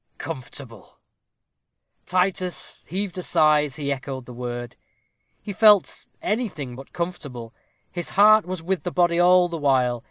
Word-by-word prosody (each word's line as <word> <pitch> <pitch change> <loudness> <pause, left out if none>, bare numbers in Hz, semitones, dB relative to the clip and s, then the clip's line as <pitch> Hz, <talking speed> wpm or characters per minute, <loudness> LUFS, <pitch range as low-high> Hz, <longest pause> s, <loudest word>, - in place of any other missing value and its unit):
Comfortable! 120 -4 -9 1.1
Titus 180 -2 -1
heaved 190 +1 -3
a - - -3
sigh 155 -4 +3
as 140 -1 -7
he 145 -2 -3
echoed 130 -1 -7
the 125 - -10
word. 120 0 -6 0.7
He 205 - -5
felt 210 -2 +4 0.2
anything 190 - -2
but 135 +2 -12
comfortable. 145 -10 -6 0.4
His 175 -2 -5
heart 210 0 +5
was 185 -3 -5
with 190 +1 -1
the 180 - -3
body 175 -1 +2
all 180 0 +5
the 170 -2 -5
while. 130 -4 +2
165 Hz, 145 wpm, -23 LUFS, 130-185 Hz, 1.1 s, heart